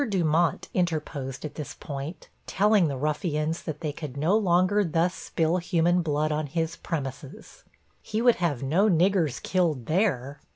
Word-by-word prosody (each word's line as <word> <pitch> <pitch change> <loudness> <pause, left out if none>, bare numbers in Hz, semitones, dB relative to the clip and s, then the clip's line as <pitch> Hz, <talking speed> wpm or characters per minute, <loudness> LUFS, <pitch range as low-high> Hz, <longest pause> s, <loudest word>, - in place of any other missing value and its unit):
Dumont 170 -3 +1
interposed 155 -6 -2
at 150 - -6
this 150 - -7
point, 140 +4 -7 0.2
telling 205 -2 +3
the 140 -2 -3
ruffians 150 +2 -1
they 155 -1 -4
could 145 -2 -7
no 160 +8 +2
longer 195 0 +3
thus 170 +1 +1
spill 165 -1 -1
human 175 0 +2
blood 155 -1 0
on 150 0 -1
his 165 +2 -2
premises 140 -4 -6 0.4
he 215 - -3
would 240 0 +4
have 150 -8 -1
'no 175 +10 +3
niggers 170 -6 +2
killed 165 -10 0
there.' 150 - 0
165 Hz, 150 wpm, -26 LUFS, 150-180 Hz, 0.4 s, would